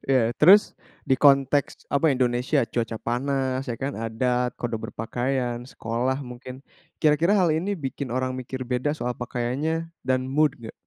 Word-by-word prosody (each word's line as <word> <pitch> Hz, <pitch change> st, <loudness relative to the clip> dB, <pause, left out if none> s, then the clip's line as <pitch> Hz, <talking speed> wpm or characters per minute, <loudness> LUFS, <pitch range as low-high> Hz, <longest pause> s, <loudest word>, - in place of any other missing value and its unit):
Iya 120 Hz, -3 st, +3 dB
terus, 195 Hz, +7 st, +7 dB, 0.3 s
di 130 Hz, -, +3 dB
konteks 140 Hz, 0 st, +3 dB
apa 150 Hz, +3 st, +3 dB
Indonesia 125 Hz, +2 st, +1 dB
cuaca 115 Hz, 0 st, -3 dB
panas 130 Hz, +2 st, -1 dB
ya 115 Hz, -, -2 dB
kan? 140 Hz, +3 st, -3 dB
Adat, 125 Hz, +2 st, -1 dB
kode 120 Hz, -2 st, -3 dB
berpakaian, 120 Hz, +1 st, -2 dB
sekolah 125 Hz, +4 st, -2 dB
mungkin, 125 Hz, +2 st, -10 dB, 0.4 s
kira-kira 155 Hz, +6 st, +3 dB
hal 180 Hz, -4 st, +3 dB
ini 190 Hz, +6 st, -1 dB
bikin 135 Hz, -2 st, -5 dB
orang 130 Hz, 0 st, -1 dB
mikir 130 Hz, 0 st, -5 dB
beda 130 Hz, +5 st, -1 dB
soal 125 Hz, -1 st, -2 dB
pakaiannya 135 Hz, +8 st, -3 dB
dan 130 Hz, 0 st, 0 dB
mood 150 Hz, +3 st, +1 dB
enggak? 110 Hz, -1 st, -9 dB
130 Hz, 150 wpm, -25 LUFS, 120-145 Hz, 0.4 s, terus